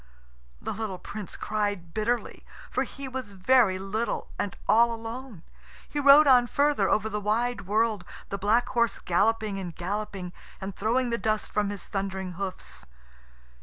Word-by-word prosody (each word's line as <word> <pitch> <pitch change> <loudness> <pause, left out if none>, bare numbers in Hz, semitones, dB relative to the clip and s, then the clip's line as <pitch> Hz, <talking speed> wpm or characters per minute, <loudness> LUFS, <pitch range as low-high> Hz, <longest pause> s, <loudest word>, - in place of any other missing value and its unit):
The - - -4
little 210 -3 -4
Prince 205 +1 -7
cried 205 -5 -2
bitterly, 230 +3 -1 0.3
for - - 0
he 275 -1 -8
was 255 -5 -6
very 195 0 +4
little 200 +5 -3
and 200 - -2
all 235 +1 +5
alone. 230 -3 -7 0.4
He 295 - -3
rode 285 +2 +8
on 250 -3 +6
further 285 -7 +2
over 215 +1 +2
the 210 -1 -3
wide 225 0 0
world, 215 -1 +1 0.3
the 200 - -3
black 225 +5 +3
horse 235 -1 +1
galloping 205 +2 +1
and 175 -4 -6
galloping, 190 -1 -4 0.3
and 190 0 -6
throwing 240 +4 +1
the 235 - 0
dust 215 +1 -1
from 205 -1 +1
his 205 -3 -6
thundering 190 -2 -3
hoofs. 175 - -7
215 Hz, 155 wpm, -27 LUFS, 195-235 Hz, 0.4 s, rode